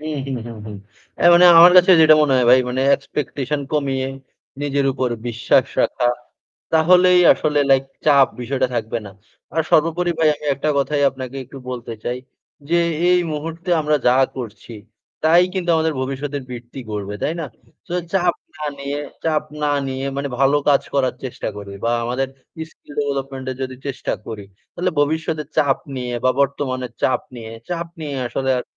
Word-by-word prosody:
হুম, 155 0 -4
হুম, 135 -2 -3
হুম, 115 -2 -8
হুম। 105 -1 -7 0.4
অ্যা - - +3
মানে 175 +1 +6
আমার 175 +2 +9
কাছে 180 +1 +7
যেটা 155 -1 +8
মনে 145 -3 +2
হয় 125 - +3
ভাই 130 +1 +7
মানে 130 +2 -1
expectation 140 0 -4
কমিয়ে 135 -3 0 0.6
নিজের 140 -1 0
উপর 130 -1 -1 0.2
বিশ্বাস 115 -1 +2 0.2
রাখা, 125 - +1 0.7
তাহলেই 180 +3 +5
আসলে 150 -1 -1
লাইক 135 0 +4 0.2
চাপ 140 -3 +6
বিষয়টা 130 +1 -1
থাকবে 115 0 -2
না। 100 - -9 0.4
আর 160 - +2
সর্বোপরি 165 +3 +2
ভাই 160 -1 +4
আমি 150 - -13
একটা 145 +3 -3
কথাই 145 +1 0
আপনাকে 130 0 -8
একটু 135 +2 -11
বলতে 120 -2 -6
চাই। 125 +1 -2 0.5
যে 170 - +3 0.3
এই 180 - +5
মুহূর্তে 165 +4 -5
আমরা 150 0 +2
যা 125 - +6 0.2
করছি। 115 -2 -8 0.5
তাই 170 +3 +6
কিন্তু 180 -2 -1
আমাদের 160 0 +1
ভবিষ্যতের 135 +2 -4
বৃত্তি 120 +1 -9
গড়বে, 105 -1 -4
তাই 155 - 0
না? 165 - -3 0.4
সো 175 - -4 0.2
চাপ 180 -3 +2 0.2
না 155 - -6
নিয়ে 140 +1 -4 0.3
চাপ 155 -2 +1 0.2
না 150 - +2 0.2
নিয়ে 130 0 -4
মানে 140 0 -2
ভালো 140 +1 +4
কাজ 140 -1 +4
করার 130 -2 +1
চেষ্টা 130 - -5
করি। 100 -1 -8
বা 115 - +1
আমাদের 125 +3 -1 0.4
skill 145 - -17
development 135 -2 -3
এর 130 - -6
যদি 130 0 -5
চেষ্টা 135 -2 -3
করি, 105 -3 -7 0.3
তাইলে 180 +1 -1
ভবিষ্যতে 155 +1 0
চাপ 140 -2 +3 0.2
নিয়ে 125 -1 -4
বা 130 - +5
বর্তমানের 130 -3 -1
চাপ 130 - +2 0.2
নিয়ে 115 -1 -8 0.2
চাপ 170 -1 -3
নিয়ে 150 -2 -5
আসলে 130 +3 -3
আর - - -3
140 Hz, 175 wpm, -20 LUFS, 130-155 Hz, 0.7 s, আমার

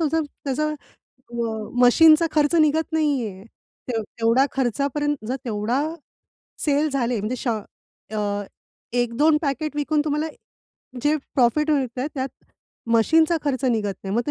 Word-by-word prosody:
तोचं 320 0 +1
त्याचं 295 +1 -3 0.6
अ, - - -8 0.5
मशीनचा 315 +6 +7
खर्च 300 +1 +2
निघत 315 +1 +2
नाही 290 -7 +1
आहे, 190 -1 -9 0.4
ते 230 -3 -1
तेवढा 230 +4 +2
खर्चापर्यंत 280 +2 -1
जर 260 - -1
तेवढा 225 +3 -1 0.8
सेल 295 +1 +2
झाले 250 -4 0
म्हणजे 215 +5 -2
श - - -5 0.7
अ, 205 -1 -1 0.5
1-2 245 +6 +3
पॅकेट 300 0 -2
विकून 295 +1 +1
तुम्हाला 300 +1 0 0.8
जे 295 +1 +3 0.2
प्रॉफिट 300 +4 +3
मिळतय, 260 -2 0
त्यात 265 -1 -2 0.7
मशीनचा 320 +8 +4
खर्च 275 -2 -1
निघत 220 -6 0
नाही. 195 - -3
मग 240 - +2
ते - - 0
275 Hz, 135 wpm, -23 LUFS, 240-305 Hz, 0.8 s, मशीनचा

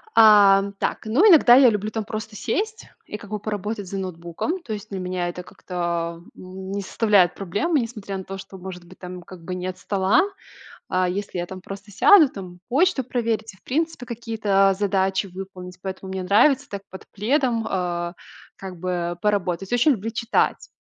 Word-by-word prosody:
А, 205 -3 +7 0.2
так, - - -2
ну, 275 - +4
иногда 280 -9 +8
я 260 -2 +8
люблю 210 -1 -2
там, 220 0 -2
просто 215 +1 -6
сесть 435 - -3 0.2
и 210 - -6
как 205 - -13
бы 210 0 -3
поработать 210 -1 -4
за 195 - -5
ноутбуком. 185 - -4
То 225 - -6
есть, 210 0 -7
для 195 -2 -5
меня 180 -1 -2
это 180 +1 -7
как-то, 180 - -11
а, 170 -1 -1 0.2
н 190 +1 -9
не 200 0 -2
составляет 200 -3 +3
проблемы, 205 - 0
несмотря 215 -5 -5
на 190 - -6
то, 195 +1 -7
что 190 0 -10
может 180 -1 -9
быть 185 +2 -16
там 180 -1 -8
как 175 -1 -13
бы 180 +1 -4
нет 185 0 -4
стола. 195 +1 +2 0.7
А, 185 0 +1
если 195 -1 -4
я 175 - -2
там 185 +1 -9
просто 200 +2 -9
сяду, 325 - +7
там 180 -5 -9
почту 290 +1 +2
проверить 230 -3 -2
и, - - -20
в - - -32
принципе, 315 -2 -2
какие-то 215 -5 +1
задачи 195 -1 +1
выполнить, 185 -1 -9
поэтому 190 0 -6
мне 190 -1 -3
нравится 260 +9 +3
так 200 -1 -6
под 190 - -11
пледом, 235 +1 0
а, 175 -2 -2 0.4
как 190 -2 -8
бы, 175 -1 -2
поработать. 195 -2 -1
Очень 245 +5 +4
люблю 225 -3 -2
читать. 230 +1 0
195 Hz, 185 wpm, -23 LUFS, 185-225 Hz, 0.7 s, иногда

